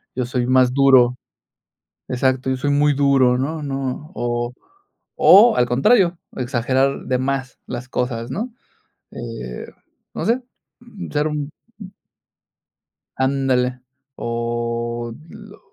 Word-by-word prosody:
yo 125 0 -1
soy 125 -1 -2
más 130 -1 +4
duro, 130 -3 +5 0.9
exacto, 130 +1 0
yo 130 - -1
soy 145 +3 -1
muy 145 +1 +3
duro, 135 -3 +3
¿no 155 +4 -3
no?, 135 +2 -4
o 120 0 -2 0.6
o 220 +4 +7
al 125 - +3
contrario, 170 - +3 0.2
exagerar 130 +2 0
de 125 -1 0
más 135 0 -3
las 120 +1 -6
cosas, 120 -1 -3
¿no?, 230 - -3 0.6
eh, 115 - -7 0.5
no - - -3
sé, 240 +4 +1 0.7
ser 150 +1 0
un 150 -1 -4 1.7
ándale, 130 -2 +1 0.4
o 120 0 -3 0.2
lo - - -13
130 Hz, 110 wpm, -20 LUFS, 120-140 Hz, 1.7 s, o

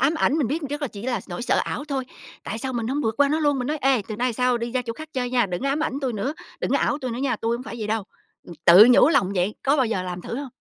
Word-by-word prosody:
ám 280 +5 +3
ảnh, 315 -2 +2
mình 280 - +1
biết 310 +5 -2
rất 295 +1 -4
là 285 - -1
chỉ 205 -2 -10
là 240 -4 -1
nỗi 175 +4 -5
sợ - - +2
ảo 295 - -4
thôi, 275 -3 -3 0.4
tại 220 - -4
sao 260 +3 -3
mình 235 -2 -2
hổng 280 +3 -1
vượt 220 - 0
qua 285 -1 +5
nó 310 +2 0
luôn? 290 -2 +2
Mình 250 - -2
nói: 305 0 -1
"Ê, 265 -5 +3
từ 215 - -4
nay 250 +3 +1
về - - -2
sau 250 +1 +1
đi 235 0 -4
ra 255 -1 0
chỗ 235 -1 -4
khác 310 +6 -10
chơi 250 -2 -2
nha, 245 -4 +2
đừng 180 +5 -4
có 275 - 0
ám 285 +2 0
ảnh 280 -2 -3
tui 260 -4 -1
nữa, 225 +9 -2 0.3
đừng - - -2
có - - +3
ảo 290 - 0
tui 255 -4 -4
nữa 235 - -4
nha, 260 -3 0
tui 230 +2 -1
hổng 250 - -8
phải - - -7
vậy 215 - -3
đâu." 215 -1 -1 0.4
Ừm, 175 - -10
tự 185 +6 +9
nhủ 250 - +6
lòng 200 - +2
vậy, 185 +3 0
có 275 +2 +3
bao 260 -4 +2
giờ 205 -5 -1
làm 180 -1 -6
thử 235 - -5
hông? 275 -2 -6
250 Hz, 345 wpm, -23 LUFS, 220-275 Hz, 0.4 s, tự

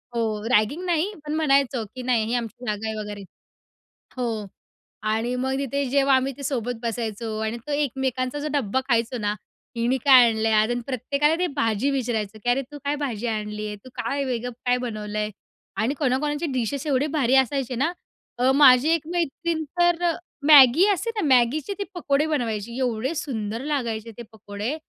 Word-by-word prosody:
हो, 215 -2 -1
रॅगिंग 255 - +2
नाही, 350 +4 0
पण 300 - -3
म्हणायचं 275 -5 +2
की 255 - -5
"नाही, 240 -3 +1
ही 230 - -3
आमची 240 +1 -4
जागा 210 +1 -2
आहे." 220 - -3
वगैरे. 205 -1 -6 1.0
हो. 225 -4 -2 0.6
आणि 230 +3 0
मग 265 +1 -1
तिथे 280 +1 -1
जेव्हा 275 0 +4
आम्ही 265 +1 0
ते 280 - -8
सोबत 245 -3 -2
बसायचो 225 -1 -3
आणि 220 +2 -2
तो - - -3
एकमेकांचा 265 -2 -1
जो 295 - -3
डब्बा 260 -3 0
खायचो 235 +1 +1
ना, 210 -1 -1 0.4
"हिने 240 +3 +1
काय 260 -3 +9
आणलंय 220 0 0
आज?" 215 +2 +3 0.2
प्रत्येकाला 280 +5 +1
ते 360 - +2
भाजी 225 0 +1
विचारायचं 225 -6 -2
की 245 - 0
"अरे 250 +3 +2
तू 295 - -8
काय 290 +1 +1
भाजी 240 -4 -3
आणली 210 -1 -3
आहे? 210 - -5
तू 205 +5 -15
काय 280 0 -2
वेगळं 245 -1 -3
काय 245 0 +3
बनवलंय?" 215 -3 -3 0.5
आणि 230 +6 +1
कोणा-कोणाचे 295 +3 0
डिशेस 260 +4 -2
एवढे 280 +1 +1
भारी 265 -2 +3
असायचे 265 -1 +1
ना. 280 +8 +1 0.5
अ, 255 +2 +4
माझी 270 0 +7
एक 320 -1 -2
मैत्रीण 335 -1 -1 0.2
तर 345 0 +3
अ, 345 - +3 0.4
मॅगी 295 +3 +8
असते 460 +5 -3
ना, - - 0
मॅगीचे 265 +10 +1
ती - - 0
पकोडे 290 -4 +1
बनवायची. 235 -6 -2
एवढे 250 +2 -1
सुंदर 230 -6 -4
लागायचे 235 -6 -2
ते 240 - -7
पकोडे. 210 +5 -5
250 Hz, 175 wpm, -24 LUFS, 225-280 Hz, 1.0 s, काय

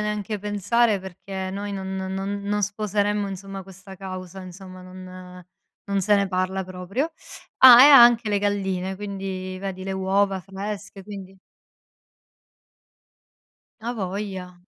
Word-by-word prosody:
neanche 210 0 -3
pensare 205 +2 +1
perché 190 0 -6
noi 200 +1 -5
no 195 -1 -4
non 190 +1 -4
non 205 +1 -1
sposeremmo 205 0 0
insomma 195 0 -7
questa 195 0 -12
causa 185 -1 -8
insomma, 185 0 -11
non 185 0 -11 0.4
non 200 -1 -1
se 205 +3 +3
ne 200 -1 +2
parla 185 +1 -1
proprio. 185 - -3 0.5
Ah, 250 -1 +10
e - - +10
ha 280 -3 +10
anche 235 -2 +5
le 205 - +1
galline, 190 -2 -1
quindi 190 -2 -5
vedi 190 -1 -5
le 195 - -4
uova 195 +1 +1
fresche, 195 +1 -7
quindi 195 -1 -10 2.4
A 235 +2 -3
voglia. 190 -3 -5
195 Hz, 130 wpm, -24 LUFS, 185-205 Hz, 2.4 s, Ah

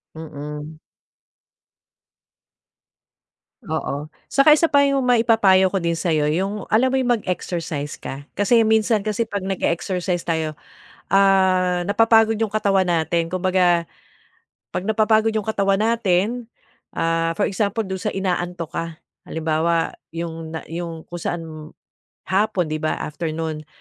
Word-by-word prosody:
Mm. 150 0 -8 2.9
Oo. 145 +2 -3 0.2
Saka 300 +2 +5
isa 330 - +3
pa 285 -3 +4
'yong 275 -2 +2
maipapayo 225 -6 +4
ko 195 - -1
din 170 -2 0
sa 170 +1 -2
'yo 155 -2 +2
'yong 190 +6 -1
alam 255 +4 +4
mo 265 - +1
'yong 250 -2 +2
mag-exercise 165 -5 -3
ka. 135 +1 -7
Kasi 225 +3 +3
minsan 220 -1 +2
kasi 215 +1 -1
'pag 200 -3 -3
nage-exercise 180 -1 -1
tayo, 160 -2 -2 0.6
ah, 185 -2 +3
napapagod 225 +2 +4
'yong 220 - +1
katawan 195 -3 +1
natin. 165 0 0
Kumbaga 180 -1 +2 0.9
'pag - - -1
napapagod 220 +2 +2
'yong 215 -2 -2
katawan 200 -2 +1
natin, 225 +1 0 0.5
ah, 165 +1 0
for 205 - +2
example, 205 +2 -1
do'n 190 -1 -5
sa 210 - -1
inaantok 180 -4 -3
ka. 165 - -2 0.4
Halimbawa, 160 +1 0 0.2
'yong 165 -1 -5
na - - -9
'yong 165 -2 -5
kung 175 -1 -8
saan 175 - -2
m 160 - -9 0.8
hapon, 190 -4 +1
'di 155 - -1
ba, 155 0 -1
afternoon, 155 0 -4
185 Hz, 130 wpm, -21 LUFS, 165-215 Hz, 2.9 s, Saka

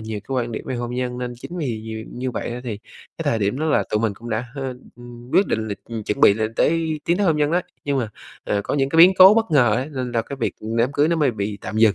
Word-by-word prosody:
nhiều 110 -1 -5
cái 135 - -4
quan 120 -2 -1
điểm - - -5
về 130 - -3
hôn 120 0 -4
nhân. 125 -1 -3
Nên 125 -1 -4
chính 175 - -7
vì 120 -8 -2
nhiều 110 0 -6
như 125 +1 -3
vậy - - -4
đó 120 - -4
thì 110 -4 -4 0.4
cái - - -2
thời 115 - +1
điểm 105 +6 -1
đó 160 - -1
là 155 - +2
tụi 105 - +1
mình 110 -3 0
cũng 120 +3 -9
đã, 110 +3 -1
h - - -8 0.4
ừm, 120 +1 -12
quyết 195 - +4
định 110 0 -2
là, 100 - -2
ừm, 115 -2 -6
chuẩn 105 - -2
bị 100 - +7
lên 110 +1 -2
tới 160 +1 +1
tiến 170 - +2
tới 200 -1 +1
hôn 160 -2 +3
nhân 150 0 +1
đó. 175 +2 +2 0.2
Nhưng 140 -1 0
mà, 115 -4 -1 0.4
ờ, 100 - 0
có - - -2
những 135 -1 +1
cái 160 - -2
biến 180 +3 +9
cố 190 +3 +10
bất 225 -4 +1
ngờ 125 -8 +4
ấy, 130 +4 -2
nên 130 -3 -4
là 115 -1 +1
cái 140 - -7
việc, - - 0
ừm, 110 +2 -4
đám 120 +4 +2
cưới 145 +2 +2
nó 170 - +1
mới 145 -5 +2
bị 105 -1 -4
tạm 110 - -6
dừng. 110 -2 +5
120 Hz, 310 wpm, -22 LUFS, 110-145 Hz, 0.4 s, cố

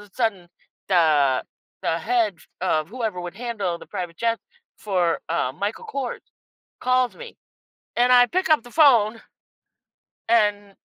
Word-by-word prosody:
a 200 - -25
sudden, 200 -8 -1 0.4
the 150 -8 +3 0.4
the 165 - 0
head 225 +1 +1
f - - -21
of 155 -4 0
whoever 220 -6 -3
would 175 0 -7
handle 205 -6 -3
the - - -13
private 180 -4 -6
jets 230 -3 -1 0.4
for, 180 -5 0
uh, 160 -6 0
Michael 200 - -4
Kors 270 - -4 0.6
calls 255 -1 +1
me, 485 -1 -10 0.6
and 245 +1 +4
I 245 0 +7
pick 370 +7 -1
up 310 -6 +5
the 245 - -14
phone. 235 -7 +4 1.1
And 205 -3 +2
210 Hz, 145 wpm, -23 LUFS, 175-245 Hz, 1.1 s, I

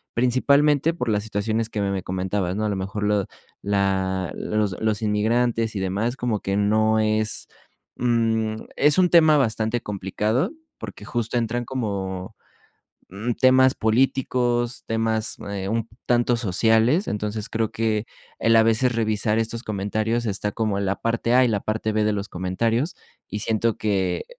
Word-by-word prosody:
Principalmente 140 +5 +3
por 125 -8 -3
las 105 -1 +1
situaciones 110 +1 -1
que 105 -2 -3
me 100 0 0
me 95 - -2
comentabas, 95 0 -2
¿no? 110 - -2
A - - 0
lo 100 - -2
mejor 95 +2 -4
lo 105 -2 +1 0.4
la 95 -2 0
los 105 -3 -1
los 110 -1 0
inmigrantes 115 +2 +1
y 100 - -1
demás. 100 +6 -1
Como 120 -4 -1
que 100 0 -2
no 110 +2 +2
es, 110 0 0 0.5
mm, 115 -2 +1 0.2
es 145 +3 +4
un 180 - +4
tema 155 -3 +6
bastante 110 -2 0
complicado, 105 - -1 0.3
porque - - -8
justo 120 +1 -2
entran 120 +1 -1
como, 100 -7 -4 0.8
mm, 105 +6 -3
temas 130 +1 +5
políticos, 120 0 0
temas, 110 0 -1
eh, 95 -1 -4
un 115 +1 -1 0.2
tanto 120 0 +2
sociales. 115 - +2
Entonces, 105 +2 -3
creo 110 -1 -1
que 110 -1 -1 0.3
el 115 0 +3
a 110 - +7
veces 115 +3 +2
revisar 110 -1 0
estos 115 +1 -2
comentarios 110 +3 -1
está 105 0 -1
como 105 -3 -1
la 100 0 -1
parte 115 +1 0
a 130 +1 +6
y 125 - +2
la 105 -3 0
parte 110 0 -2
b 105 0 +1
de 105 - +2
los 100 0 -4
comentarios, 115 - -1 0.3
y 105 - -4
siento 110 +1 0
que 100 - 0
110 Hz, 160 wpm, -23 LUFS, 105-120 Hz, 0.8 s, a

